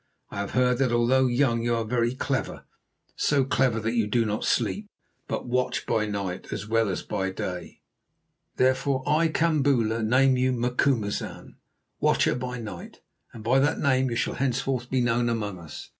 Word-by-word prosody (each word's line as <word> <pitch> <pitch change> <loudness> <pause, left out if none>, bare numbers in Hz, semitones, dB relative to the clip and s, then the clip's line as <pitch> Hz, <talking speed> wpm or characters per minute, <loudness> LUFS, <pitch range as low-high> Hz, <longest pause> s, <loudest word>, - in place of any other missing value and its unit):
I - - -7
have 100 - -3
heard 125 -1 +3
that 130 -3 +2
although 125 +3 +3
young 120 -2 +2
you 120 0 +1
are 115 - -1
very 120 +1 0
clever, 130 0 -3 0.5
so 140 -3 +2
clever 130 -3 +1
that 115 +2 -1
you 115 -3 +1
do 115 +2 +1
not 105 0 -2
sleep, 205 +1 0 0.4
but - - -3
watch 125 +1 -1
by 110 -1 0
night 100 -3 -4
as 105 - -4
well 115 -1 +2
as 95 - -3
by 95 -1 -2
day. 90 -1 -6 0.7
Therefore, 130 +1 +1
that 145 - 0
I, 160 +2 +3
Kambula, 140 -9 +1
name 130 +3 +4
you 130 0 +2
Macumazahn, 120 -3 -1 0.4
Watcher - - +3
by 125 0 -4
night, 105 -6 -9 0.3
and 110 - -10
by 125 +4 +3
that 145 +2 +2
name 130 -2 +2
you 120 - -3
shall - - -1
henceforth 130 -1 -1
be 130 -1 +1
known 120 0 +1
among 105 -5 -3
us. 80 -4 -10
120 Hz, 175 wpm, -26 LUFS, 110-130 Hz, 0.7 s, name